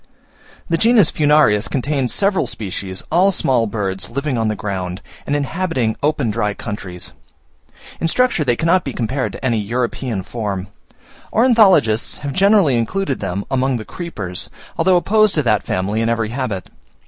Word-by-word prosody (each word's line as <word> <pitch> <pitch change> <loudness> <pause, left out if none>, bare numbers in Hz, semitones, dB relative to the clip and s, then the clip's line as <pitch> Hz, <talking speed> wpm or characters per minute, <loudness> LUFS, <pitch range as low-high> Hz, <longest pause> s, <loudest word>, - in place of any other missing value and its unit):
The 165 -2 0
genus 225 -6 +5
Furnarius 145 -8 +3
contains 135 -1 -1
several 195 -8 +1
species, 95 -4 -4
all 185 +4 +4
small 125 -10 +1
birds, 100 -3 -3
living 140 +2 -2
on 115 -1 0
the 110 - -1
ground, 95 -3 -4 0.3
and 145 - 0
inhabiting 145 -5 -1
open 145 -6 +1
dry 105 -1 -1
countries. 95 -5 -6 0.9
In 165 - 0
structure 250 -3 +2
they 125 -4 +2
cannot 170 +6 +2
be 135 - -5
compared 130 +3 -2
to - - -7
any 115 -3 +1
European 115 -1 -2
form. 100 -3 -4 0.6
Ornithologists 210 - +4
have 140 - -3
generally 195 - +4
included 140 - -2
them 95 +3 -3
among 130 -1 +1
the 110 - -7
creepers, 105 - -6 0.3
although 185 -1 +3
opposed 215 +3 +3
to 150 - +2
that 105 -5 +2
family 100 +4 -1
in 115 - +1
every 115 -2 0
habit. 115 -7 -3
125 Hz, 155 wpm, -19 LUFS, 105-165 Hz, 0.9 s, genus